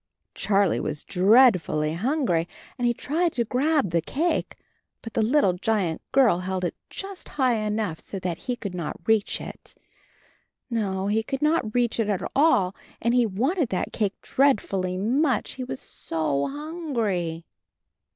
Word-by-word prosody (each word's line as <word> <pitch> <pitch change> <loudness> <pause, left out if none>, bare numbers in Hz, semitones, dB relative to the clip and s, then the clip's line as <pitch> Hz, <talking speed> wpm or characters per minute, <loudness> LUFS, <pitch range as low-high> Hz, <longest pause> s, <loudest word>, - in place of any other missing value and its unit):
Charlie 200 -3 +2
was 150 -1 -3
dreadfully 185 - +4
hungry 195 - 0 0.3
and 245 -2 0
he 240 - +3
tried 330 +7 0
to 240 - +1
grab 275 - +1
the 170 0 +2
cake, 320 - -1 0.5
but 225 - -8
the - - +1
little 225 -4 +3
giant 180 -3 -1
girl 245 -10 +4
held 185 0 -3
it - - -2 0.2
just 390 -1 -6
high 260 -3 +3
enough 210 -5 -2
so 195 - -7
that 180 -3 -3
he 250 - -3
could 200 -6 -6
not 170 -4 -4
reach 220 -2 +2
it. - - -9 1.0
No, 195 -4 -1
he 210 +2 +1
could 270 +6 -4
not 300 -8 +1
reach 240 -1 +1
it 215 -2 +1
at 200 -3 -1
all, 235 - +4 0.3
and 235 +1 +1
he 245 -2 +4
wanted 260 - 0
that 185 - -2
cake 205 -3 -1
dreadfully 195 -9 +1
much, 250 +4 +1
he 260 - -6
was 255 +1 -5
so 150 -4 -2
hungry. 235 - -3
220 Hz, 155 wpm, -25 LUFS, 185-265 Hz, 1.0 s, dreadfully